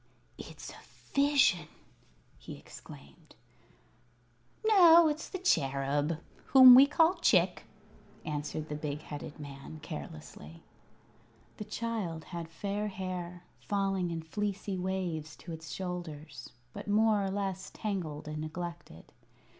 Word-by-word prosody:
"It's - - -9
a - - -12 0.4
Vision!" 280 - +3 0.7
he - - -9
exclaimed. 70 -1 -14 1.3
"No, 345 -6 +7
it's 305 +1 -3
the 375 - -4
Cherub 145 - +1 0.3
whom 260 -2 +10
we 265 +3 +9
call 325 +4 +4
Chick," - - +3 0.6
answered 150 0 -4
the 150 - -3
big 150 0 -4
headed 150 0 -8
man, 140 +2 -9
carelessly. 80 - -9 0.9
The 210 - -6
child 210 -8 -4
had 170 -2 -7
fair 200 +5 -3
hair, 180 -3 -5 0.2
falling 195 -3 -1
in 165 -1 -4
fleecy 200 +3 -3
waves 180 -5 -3
to 175 - -10
its 160 -1 -8
shoulders, 160 -7 -6 0.2
but - - -8
more 210 0 +3
or 195 - -1
less 190 -1 -3
tangled 175 -9 -4
and 155 0 -5
neglected. 165 - -7
175 Hz, 115 wpm, -31 LUFS, 155-210 Hz, 1.3 s, whom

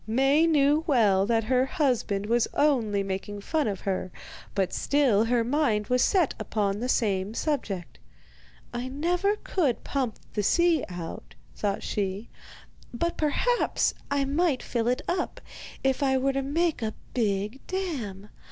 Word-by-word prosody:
Maie 270 +8 +3
knew 300 0 +3
well 205 -9 +3
that 225 -1 +2
her 250 +3 +2
husband 250 - 0
was 235 +2 +2
only 230 -9 +2
making 195 +1 -4
fun 310 +5 0
of 200 -3 -3
her, 185 -2 -2 0.4
but 190 -2 0
still 255 -7 +2
her 235 0 +2
mind 235 -5 +1
was 250 0 +3
set 360 -7 +3
upon 205 -2 -1
the 250 +2 -2
same 205 -3 0
subject. 220 - -3 0.7
'I 240 +1 -3
never 350 +9 0
could 315 - -1
pump 260 -6 -2 0.2
the 210 - 0
sea 340 - +3
out,' 175 -2 -7 0.2
thought 200 -1 -2
she, 200 +1 -3 0.6
'but 340 +8 -1
perhaps 475 +11 +1 0.2
I 280 -1 +1
might 290 -1 +1
fill 235 -1 -1
it 250 +1 0
up, 355 0 -2 0.4
if 265 0 +1
I 265 -1 +3
were 270 +1 +1
to 275 - 0
make 315 +2 0
a 220 -1 -2 0.2
big 210 +1 -1
dam. 245 - -4
250 Hz, 150 wpm, -27 LUFS, 210-290 Hz, 0.7 s, Maie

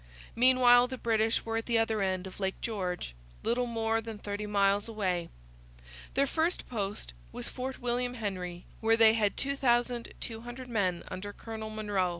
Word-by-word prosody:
Meanwhile 245 0 +6
the 260 +1 -5
British 225 -1 +1
were 225 0 -1
at 225 - -3
the 235 -1 +3
other 225 -2 +1
end 190 -1 0
of 190 - -9
Lake 190 -1 -1
George, 180 - -3 0.3
little 245 +2 +1
more 225 -1 0
than 225 -1 -7
thirty 205 0 -4
miles 200 0 +2
away. 185 -6 -1 0.9
Their 275 +1 +4
first 325 +5 0
post 200 - -3 0.2
was - - -3
Fort 260 +1 -5
William 245 +1 -1
Henry, 185 -6 -4
where 225 0 +3
they 225 -1 +8
had 210 -3 +1
2,200 240 -2 -1
men 195 -7 0
under 205 +2 -5
Colonel 220 +1 -7
Monro. 205 -4 0
225 Hz, 155 wpm, -30 LUFS, 200-240 Hz, 0.9 s, they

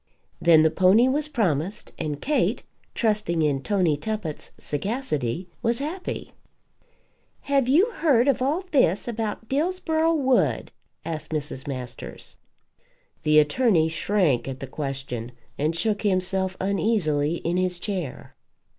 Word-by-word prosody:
Then 160 -2 +6
the 160 - +4
pony 190 +8 +5
was 290 +3 0
promised; 195 - -1
and 150 -3 -3
Kate, 300 - 0 0.3
trusting 210 -8 +1
in 140 -3 +1
Tony 180 -3 +1
Tuppett's 180 -1 -4
sagacity, 170 - -2
was 235 0 +1
happy. 315 +8 -5 1.1
"Have 275 -3 +1
you 350 - +4
heard 280 - +3
of 275 -3 +2
all 295 +8 +1
this 210 - +2
about 225 -1 -3
Dillsborough 325 +2 +1
Wood?" 265 -4 +1 0.3
asked 160 -2 -4
Mrs. 150 -3 -3
Masters. 125 -3 -7 0.8
The 155 -1 +3
attorney 160 - +4
shrank 165 - +1
at 135 -1 -5
the - - -5
question, 135 -4 -5 0.3
and 155 +3 0
shook 205 +4 0
himself 190 -1 0
uneasily 185 -7 +1
in 175 +1 -2
his 185 -1 0
chair. 180 -7 -5
190 Hz, 125 wpm, -25 LUFS, 155-245 Hz, 1.1 s, Then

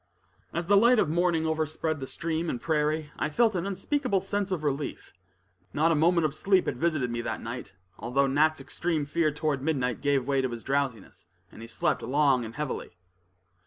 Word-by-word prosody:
As 170 +1 -2
the 205 - +4
light 235 +5 +6
of 180 - +2
morning 170 0 +1
overspread 155 0 -1
the 135 - -5
stream 165 +2 -2
and 120 - -2
prairie, 155 0 0
I - - 0
felt 220 +6 +2
an 180 +2 -1
unspeakable 200 +2 0
sense 200 +1 -2
of 180 -5 -2
relief. 145 0 -3 0.6
Not 160 +3 +3
a - - +3
moment 170 +2 +3
of 150 - 0
sleep 190 +3 +2
had - - -1
visited 155 -7 0
me 120 0 -2
that - - -3
night, 115 -3 -7 0.3
although 130 +4 +1
Nat's 155 +3 +2
extreme 165 -4 -2
fear 155 +2 +1
toward 150 -2 -1
midnight 130 -5 -1
gave 140 -3 +1
way 135 0 +1
to 130 - -1
his 120 -1 -7
drowsiness, 135 -10 -3 0.2
and - - -12
he 115 - -8
slept 115 - 0
long 140 -2 +2
and 115 - -9
heavily. 150 -2 -4
155 Hz, 195 wpm, -28 LUFS, 135-170 Hz, 0.6 s, light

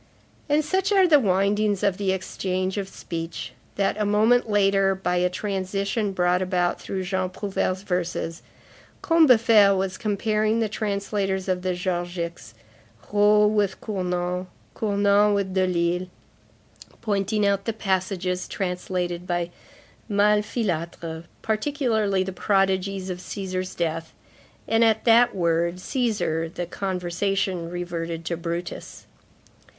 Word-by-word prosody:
And, 295 +1 +2
such 380 +5 0
are 385 -2 +5
the 300 -4 +6
windings 200 -1 +1
of 195 -2 +2
the 195 -2 0
exchange 185 0 -2
of 195 -1 -4
speech, 165 -2 -6 0.2
that, 200 +1 0
a - - +3
moment 220 +3 +3
later, 195 -2 +3
by 180 -1 -1
a 180 0 +2
transition 195 +2 -2
brought 180 -1 +1
about 180 -2 0
through 190 -1 -4
Jean 185 0 -1
Prouvaire's 190 -1 -2
verses, 175 -3 -2 0.6
Combeferre 230 - +6
was 190 -1 -2
comparing 215 +1 0
the 225 - +1
translators 200 -2 -2
of 185 -1 0
the 185 0 -1
Georgics, 175 - -4 0.6
Raux 210 0 +5
with 205 -3 +1
Cournand, 180 -2 -2 0.3
Cournand 205 0 +3
with 195 -2 -1
Delille, 180 -1 +1 0.9
pointing 205 -1 0
out 200 -1 +1
the 225 - 0
passages 185 -3 -1
translated 180 -1 -3
by 175 -1 -1 0.6
Malfilâtre, 200 -6 0 0.2
particularly 220 -4 0
the 190 0 -5
prodigies 195 0 0
of 180 - -5
Cæsar's 185 -1 -4
death; 165 -1 -2 0.5
and 225 +1 +3
at 220 -1 +2
that 235 0 +5
word, 170 -1 +1
Cæsar, 180 - -1
the 175 - -4
conversation 185 -1 -2
reverted 170 -2 -4
to 170 - -1
Brutus. 170 +1 -6
190 Hz, 120 wpm, -24 LUFS, 180-210 Hz, 0.9 s, the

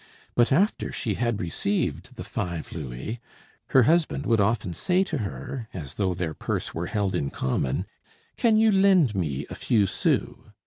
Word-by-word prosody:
But 120 0 +3
after 195 +10 +2
she 120 -10 -2
had 120 0 -1
received 100 +4 -2
the - - -6
five 85 -3 -4
louis, 75 - -5 0.5
her 130 - +5
husband 155 -1 +2
would 115 -3 +3
often 105 -3 0
say 180 - +2
to 165 -6 -3
her, 115 +3 -5
as 75 -7 -6
though 95 -3 0
their 85 -3 -2
purse - - -3
were 85 +1 -3
held 100 -3 -1
in 70 -6 -1
common: 65 0 -1 0.5
"Can 225 -2 +3
you 220 0 +5
lend 190 - +4
me 75 -8 -2
a - - -3
few 110 -4 +2
sous?" 95 - 0
105 Hz, 170 wpm, -26 LUFS, 85-140 Hz, 0.5 s, her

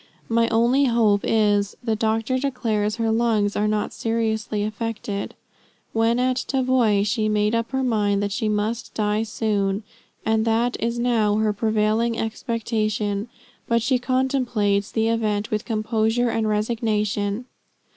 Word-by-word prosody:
My 230 0 +3
only 240 +5 +3
hope 225 -5 +3
is, 205 -2 +1
the 225 -2 0
doctor 225 +4 0
declares 225 -6 -1
her 225 -1 0
lungs 220 -3 +1
are 210 +1 +1
not 210 0 -1
seriously 220 -2 -1
affected. 215 -1 -4 0.6
When 225 +1 +2
at 255 0 +1
Tavoy, 255 -7 +2
she 215 0 0
made 210 0 +1
up 230 0 0
her 265 0 -1
mind 205 -4 +1
that 200 - -2
she 220 0 -1
must 215 +3 -2
die 210 0 +1
soon, 210 -2 -1 0.4
and 220 0 +2
that 230 +2 +1
is 235 +1 -1
now 230 -4 +2
her 215 0 +1
prevailing 220 +2 +1
expectation; 215 -2 -2 0.4
but 230 -1 +2
she 250 0 +2
contemplates 245 -6 0
the 225 0 +1
event 215 -2 0
with 215 +1 -1
composure 225 +1 0
and 220 -1 0
resignation. 210 0 -1
220 Hz, 140 wpm, -23 LUFS, 210-235 Hz, 0.6 s, My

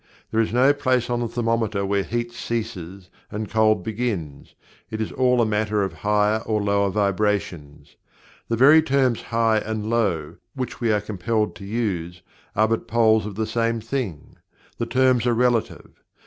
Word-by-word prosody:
There 110 - +2
is 110 - -1
no 130 +4 +4
place 130 -4 0
on 120 - 0
the 120 - -1
thermometer 115 -4 -1
where 100 0 +1
heat 120 +4 -3
ceases 100 -6 -5 0.2
and 105 +1 -4
cold 110 -3 +3
begins. 100 - -4 0.3
It 110 - -5
is 110 - -2
all 125 -1 +2
a 120 - +4
matter 105 -1 0
of 95 -3 -3
higher 105 +5 +1
or 110 -1 -1
lower 100 -1 +1
vibrations. 95 -8 -2 0.5
The 115 - 0
very 145 +6 +7
terms 135 -5 +1
"high" 115 -1 +1
and 110 0 -4
"low," 95 -10 0 0.2
which 130 -2 -5
we 115 -2 +2
are 105 -1 +1
compelled 105 +2 -2
to 100 - -10
use, 90 -6 -3 0.3
are 110 +2 +3
but 115 +1 -2
poles 110 -2 +3
of 105 - -7
the 110 +1 -1
same 115 +1 0
thing 110 - -5 0.4
the 115 - -1
terms 125 0 +2
are 120 - +2
relative. 120 -1 -1
110 Hz, 170 wpm, -23 LUFS, 100-120 Hz, 0.5 s, very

